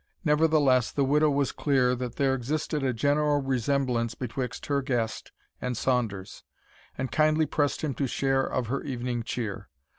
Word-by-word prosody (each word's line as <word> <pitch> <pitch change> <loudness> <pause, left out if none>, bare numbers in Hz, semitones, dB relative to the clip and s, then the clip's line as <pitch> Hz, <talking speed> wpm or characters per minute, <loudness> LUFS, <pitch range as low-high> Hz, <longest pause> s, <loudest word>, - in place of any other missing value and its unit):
Nevertheless, 150 -5 +3
the 140 - +1
widow 150 +3 +3
was 140 -1 +1
clear 130 -4 +2
that 125 -1 -4
there 135 -1 +2
existed 145 +4 -2
a 135 -1 +1
general 145 +4 +2
resemblance 130 -3 0
betwixt 125 0 -4
her 140 -1 0
guest 120 -5 -2 0.3
and 125 -2 -2
Saunders, 115 -8 -1 0.5
and 130 0 -3
kindly 155 0 +3
pressed 145 -1 -1
him 150 -3 -1
to 135 +1 -1
share 135 +1 +1
of 130 -2 -1
her 135 +5 -2
evening 125 -3 -3
cheer. 110 - -4
135 Hz, 155 wpm, -27 LUFS, 125-145 Hz, 0.5 s, Nevertheless